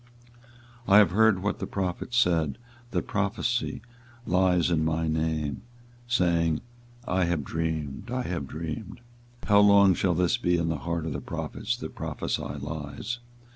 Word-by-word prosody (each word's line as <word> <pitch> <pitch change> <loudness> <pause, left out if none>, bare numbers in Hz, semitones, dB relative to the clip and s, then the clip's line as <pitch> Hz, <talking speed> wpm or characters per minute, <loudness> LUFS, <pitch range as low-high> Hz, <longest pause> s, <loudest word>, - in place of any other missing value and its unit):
24:023:025 95 - +3
I - - +10
have 100 -5 +6
heard 105 -1 +4
what 100 - -1
the - - -3
prophets 95 +5 -3
said, 80 - +2 0.3
that - - -1
prophesy 105 +4 -1 0.4
lies 90 -1 +3
in 80 -2 +2
my 80 0 0
name, 80 -3 -1 0.5
saying, 85 -8 +2 0.5
I 90 0 +2
have 85 -3 0
dreamed, 80 - -3
I 125 +1 -1
have 85 - -3
dreamed. 80 - -6 0.4
24:023:026 - - -9
How 100 0 +7
long 100 -2 +7
shall 90 0 +1
this 90 +6 +2
be 90 -7 +1
in 85 -1 0
the 80 - -1
heart 85 +2 -3
of 80 - -3
the - - -4
prophets - - -3
that - - -7
prophesy - - -3
lies? 75 - -5
85 Hz, 160 wpm, -27 LUFS, 80-100 Hz, 0.5 s, I